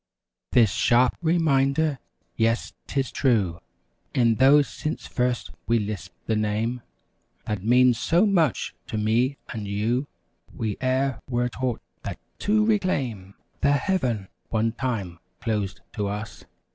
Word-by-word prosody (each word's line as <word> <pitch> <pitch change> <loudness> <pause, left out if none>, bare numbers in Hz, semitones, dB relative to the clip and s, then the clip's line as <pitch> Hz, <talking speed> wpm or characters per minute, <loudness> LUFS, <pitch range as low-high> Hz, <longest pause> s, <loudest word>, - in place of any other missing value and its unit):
This 115 -5 +5
sharp 120 +2 +3
reminder! 155 -3 +2 0.4
Yes, 115 +1 +1
'tis 135 -2 -1
true! 100 -11 +1 0.6
E'en 115 -2 +5
though 135 +5 +6
since 150 +2 -5
first 125 -1 -1 0.2
we 115 - +3
lisped 105 -3 -5
the 110 - 0
Name 110 +3 -1 0.6
That 105 -3 -3
means 125 +1 +5
so 175 +5 +3
much 170 - +1
to - - -3
me 115 +6 +1
and 110 -5 -5
you. 115 +7 0 0.4
We 110 -3 -3
e'er 130 -1 +1
were 120 0 +1
taught, 125 -1 -2 0.2
that, - - -5 0.2
to 215 +1 +2
reclaim 135 - 0 0.2
The 140 - +3
Heaven, 130 - 0 0.2
one 115 0 +1
time 110 -9 -3 0.2
closed 105 -4 -2
to 105 -2 -2
us. 105 +1 -6
120 Hz, 130 wpm, -25 LUFS, 110-135 Hz, 0.6 s, though